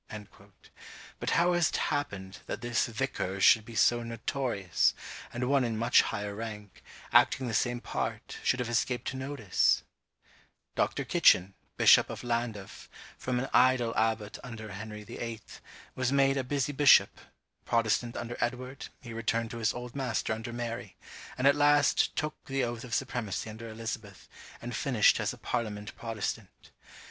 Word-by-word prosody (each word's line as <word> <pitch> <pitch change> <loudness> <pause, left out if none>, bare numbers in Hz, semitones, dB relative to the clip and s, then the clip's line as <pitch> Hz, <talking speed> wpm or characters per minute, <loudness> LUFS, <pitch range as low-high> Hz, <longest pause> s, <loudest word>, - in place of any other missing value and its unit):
But - - -2
how 175 +1 +3
has 175 -2 +3
it - - -2
happened 95 -10 -3
that - - -4
this 120 0 0
vicar 110 -5 -3
should 110 +3 +6
be 115 +1 -11
so 120 +2 +4
notorious, 115 -4 0 0.4
and 125 +1 -2
one 140 -1 +3
in 115 -2 -1
much 120 +2 +5
higher 105 -2 -4
rank, 105 -2 -8 0.3
acting 130 - +4
the 115 - -3
same 120 +2 +1
part, - - -4
should 130 - +1
have 125 - -1
escaped 120 +2 -1
notice? 130 -7 +1 0.9
Dr. - - -1
Kitchen, 95 +2 +4 0.2
bishop - - +6
of - - -7
Llandaff, 115 -5 -4 0.3
from 125 -1 -2
an 135 - -2
idle 125 -1 +4
abbot 110 -1 0
under 110 -4 -8
Henry 105 +1 -7
VIII. 115 +1 -6 0.5
was 130 0 -1
made 135 0 +3
a 135 - 0
busy 140 +2 -1
bishop; 145 0 +5 0.4
Protestant 115 +1 0
under 120 +1 -5
Edward, 125 +2 -3
he 120 -2 -9
returned 115 0 -1
to 115 - -6
his 110 - +2
old 125 0 -8
master 125 -5 -1
under 115 +2 -6
Mary; 115 -4 -5 0.4
and 130 - -1
at 140 - +7
last 145 -1 +3
took 150 -1 -3
the 135 -1 -1
oath 120 -1 -3
of 120 -4 -3
supremacy 115 -5 -3
under 115 +1 -9
Elizabeth, 110 -2 -7 0.4
and 120 0 -5
finished 120 -5 +3
as - - 0
a - - -10
parliament 105 -4 -4
Protestant. 110 -3 -5
120 Hz, 155 wpm, -30 LUFS, 110-130 Hz, 0.9 s, at